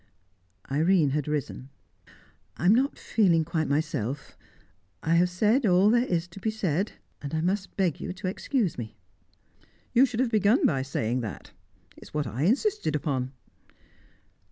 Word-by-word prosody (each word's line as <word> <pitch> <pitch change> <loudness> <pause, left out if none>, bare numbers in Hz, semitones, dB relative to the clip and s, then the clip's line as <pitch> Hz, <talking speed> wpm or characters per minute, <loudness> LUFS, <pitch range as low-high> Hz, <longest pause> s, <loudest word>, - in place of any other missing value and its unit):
Irene 160 0 +3
had 150 0 -1
risen. 145 -3 -3 0.9
"I 170 - -3
am 190 - +7
not 265 +5 +1
feeling 175 -8 +2
quite 160 -2 -1
myself. 145 -3 -2 0.7
I 165 - +1
have 175 +2 +4
said 215 +9 +2
all 195 0 +4
there 240 +2 +3
is 175 -1 -1
to 175 - -11
be 220 - -1
said, 195 -3 -1 0.3
and 145 +2 -4
I 155 - 0
must 190 +3 -2
beg 180 -7 0
you - - -4
to 185 - -6
excuse 195 - -1
me." 110 -2 -7 1.0
"You 260 +3 +6
should 245 -2 -5
have 255 -2 +1
begun 215 +3 +3
by 135 -4 +2
saying 125 -2 -1
that. 110 -4 -7 0.4
It - - -17
is - - -14
what 150 -1 0
I 130 +7 -2
insisted 270 - +1
upon." 130 -4 -2
175 Hz, 160 wpm, -27 LUFS, 145-210 Hz, 1.0 s, am